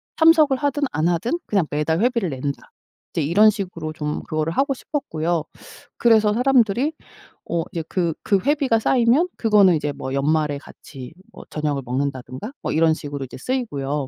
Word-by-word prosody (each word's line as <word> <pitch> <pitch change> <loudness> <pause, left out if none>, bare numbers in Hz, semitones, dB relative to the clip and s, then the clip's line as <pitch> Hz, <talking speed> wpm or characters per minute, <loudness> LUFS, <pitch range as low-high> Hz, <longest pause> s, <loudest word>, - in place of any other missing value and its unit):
참석을 320 -4 +5
하든 285 +1 -1
안 160 +2 +1
하든 175 - -1
그냥 195 -5 +1
매달 150 +3 0
회비를 235 -6 +1
낸다.' 140 0 -5 0.4
이제 - - 0
이런 195 +9 +5
식으로 180 -7 -4
좀 150 -1 -3
그거를 155 +1 -2
하고 275 - +1
싶었고요. 175 - -2 0.5
그래서 220 -3 +4
사람들이 250 +2 +2 0.6
어 170 -1 0
이제 165 - -3
그 170 -3 0
그 200 - +2
회비가 280 -5 +2
쌓이면 250 +9 +3
그거는 205 -5 +5
이제 150 -1 -2
뭐 130 -1 -6
연말에 150 +1 +1
같이 135 -2 -12 0.2
뭐 - - -11
저녁을 150 -2 -2
먹는다든가 130 - -4
뭐 - - -3
이런 160 0 +4
식으로 145 -3 -5
이제 130 - -11
쓰이고요. 145 - -2
170 Hz, 360 characters per minute, -22 LUFS, 150-235 Hz, 0.6 s, 참석을